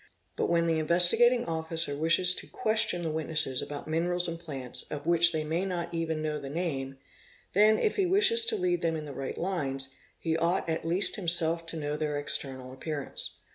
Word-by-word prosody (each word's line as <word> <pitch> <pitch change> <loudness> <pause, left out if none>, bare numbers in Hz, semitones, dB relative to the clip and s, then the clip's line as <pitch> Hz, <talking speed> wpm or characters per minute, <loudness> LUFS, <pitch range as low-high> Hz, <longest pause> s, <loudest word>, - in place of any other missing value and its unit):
But - - -2
when 170 0 +1
the 165 -1 0
Investigating 180 +10 +5
Officer 160 -2 0
wishes 170 +4 +4
to - - -7
question 215 -6 0
the 160 - -3
witnesses 155 -4 -1
about 145 0 -8
mineral: 170 +3 -1
and 165 0 -5
plants 135 -7 -2
of 145 -1 -7
which 170 0 +4
they 155 -2 -2
may 160 +4 -2
not 180 -3 -4
even. 160 -2 -3
know 150 -1 -3
the 140 -1 -8
name, 135 -4 -4 0.6
then, 215 +2 +4
if 435 -1 -1
h 380 - +2
wishes 440 +4 +5
to 450 - +2
lead 360 -3 -1
them 165 -1 -1
in 155 -1 -6
the 145 - -9
right 135 0 -6
lines, 135 -8 -3 0.3
he 160 -1 -2
ought 170 +3 -1
at 160 0 -3
least 180 +4 +1
himself 165 -2 +1
to 165 - -4
kno 150 -1 -4
their 150 -1 -3
external 135 -3 -4
appearance. 145 +1 -1
165 Hz, 195 wpm, -28 LUFS, 150-175 Hz, 0.6 s, Investigating